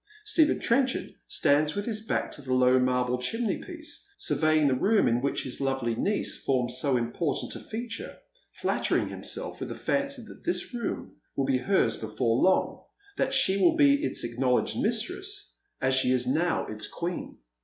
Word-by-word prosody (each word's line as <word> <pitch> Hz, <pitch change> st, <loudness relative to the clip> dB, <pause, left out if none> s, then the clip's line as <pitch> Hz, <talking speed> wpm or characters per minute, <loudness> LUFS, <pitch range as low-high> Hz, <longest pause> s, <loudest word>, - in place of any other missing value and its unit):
Stephen 340 Hz, -8 st, +3 dB
Trenchard 260 Hz, +2 st, +1 dB
stands 150 Hz, +1 st, +2 dB
with 205 Hz, 0 st, -2 dB
his 220 Hz, -2 st, -1 dB
back 220 Hz, -, -1 dB
to -, -, -7 dB
the 130 Hz, -2 st, -1 dB
low 130 Hz, 0 st, +5 dB
marble 125 Hz, 0 st, +1 dB
chimney 225 Hz, -, -1 dB
piece, 340 Hz, +2 st, -5 dB
survejang 155 Hz, -1 st, +3 dB
the 135 Hz, -, +3 dB
room 205 Hz, -, +3 dB
in 120 Hz, +1 st, +2 dB
which 140 Hz, -, -1 dB
his 130 Hz, +1 st, -5 dB
lovely 135 Hz, -4 st, 0 dB
niece 200 Hz, -, 0 dB
forms 125 Hz, -2 st, +1 dB
so 135 Hz, -2 st, +1 dB
important 120 Hz, +7 st, -2 dB
a -, -, -6 dB
feature, 225 Hz, +1 st, -6 dB, 0.3 s
flattering -, -, 0 dB
himself -, -, -4 dB
with -, -, -5 dB
the -, -, -5 dB
fancy 280 Hz, -3 st, -1 dB
that 220 Hz, -, -13 dB
this 350 Hz, -6 st, -1 dB
room 235 Hz, -3 st, -4 dB, 0.2 s
will 135 Hz, -, 0 dB
be 130 Hz, -1 st, +1 dB
hers 195 Hz, +9 st, +2 dB
before 115 Hz, +2 st, 0 dB
long, 190 Hz, 0 st, +2 dB, 0.3 s
that 265 Hz, 0 st, +1 dB
she 265 Hz, -8 st, +4 dB
will 335 Hz, -2 st, +5 dB
be 285 Hz, -1 st, +4 dB
its -, -, -1 dB
acknowledged 125 Hz, +2 st, 0 dB
mistress 380 Hz, -, -2 dB, 0.3 s
as 130 Hz, 0 st, +1 dB
she 130 Hz, -1 st, +3 dB
is 125 Hz, -1 st, +2 dB
now 160 Hz, +7 st, +1 dB
its 105 Hz, -1 st, -4 dB
queen. 175 Hz, +1 st, -5 dB
155 Hz, 175 wpm, -27 LUFS, -, 0.3 s, low